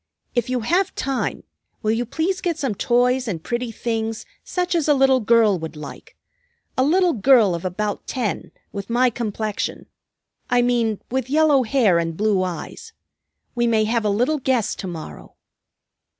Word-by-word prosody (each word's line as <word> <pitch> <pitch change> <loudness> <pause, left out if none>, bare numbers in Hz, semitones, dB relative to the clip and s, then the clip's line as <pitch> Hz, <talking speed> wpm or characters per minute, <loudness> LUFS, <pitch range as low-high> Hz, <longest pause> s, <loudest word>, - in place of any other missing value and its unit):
"If 240 -1 0
you 255 -1 0
have 350 - +1
time, 270 -1 -2 0.4
will 215 - +2
you 230 +1 -1
please 360 +8 -1
get 345 -3 -1
some 270 -8 -1
toys 250 +4 +1
and 170 -7 -4
pretty 240 -1 -3
things 225 0 -3 0.2
such 360 0 -2
as 330 -4 +1
a 295 - +5
little 265 -1 +4
girl 220 -4 +3
would 160 0 -6
like; 150 -2 -10 0.6
a 255 - +2
little 350 +4 +3
girl 225 -3 +4
of 170 +1 -4
about 205 +3 -3
ten, 245 -6 -3 0.2
with 200 +1 -6
my 245 +1 +3
complexion, 215 -2 -3 0.6
I 245 0 +3
mean, 235 -4 +1
with 260 -1 -1
yellow 300 -2 +4
hair 220 -7 +3
and 165 -1 -3
blue 210 -2 +2
eyes. 185 - -6 0.6
We 240 -1 +1
may 220 -2 +3
have 225 +1 0
a 210 - +1
little 245 +9 +1
guest 255 -4 0
to 190 - -4
morrow." 160 - -9
235 Hz, 165 wpm, -22 LUFS, 210-265 Hz, 0.6 s, a